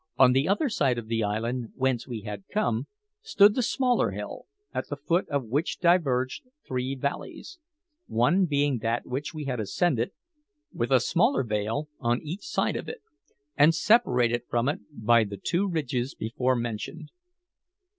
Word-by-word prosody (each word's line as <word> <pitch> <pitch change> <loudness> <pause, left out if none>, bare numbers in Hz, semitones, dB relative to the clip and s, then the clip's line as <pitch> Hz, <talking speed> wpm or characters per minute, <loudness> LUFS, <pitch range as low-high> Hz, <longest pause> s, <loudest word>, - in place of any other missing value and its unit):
On 130 -1 +7
the 135 +3 +2
other 205 +11 +2
side 140 - +1
of 120 - -4
the 115 -1 0
island, 115 +3 -2
whence 130 -2 0
we 120 -4 -5
had 105 -2 -7
come, 205 - 0 0.3
stood 210 - +5
the 255 - 0
smaller 250 +1 +1
hill, - - -7 0.3
at - - -3
the 145 - -2
foot 165 +6 0
of 140 -2 0
which 140 +9 -1
diverged 140 -8 +2 0.3
three 130 +1 -2
valleys 140 - -5 0.5
one 175 +12 +3
being 145 -4 +1
that 115 +2 -1
which 140 +6 -4
we 150 -1 -5
had 125 -3 -2
ascended, 120 - 0 0.6
with - - -2
a - - +5
smaller 275 - +2
vale 110 +6 -2
on 120 0 +1
each 165 +6 -5
side 320 - -1
of - - -4
it, 470 -1 -8 0.5
and 150 +3 +5
separated 125 - +3
from 120 +1 +1
it 145 - 0
by 115 +1 +3
the 100 -1 -6
two 180 - 0
ridges 135 -6 -2
before 125 +3 0
mentioned. 120 +7 -5
130 Hz, 165 wpm, -27 LUFS, 120-165 Hz, 0.6 s, On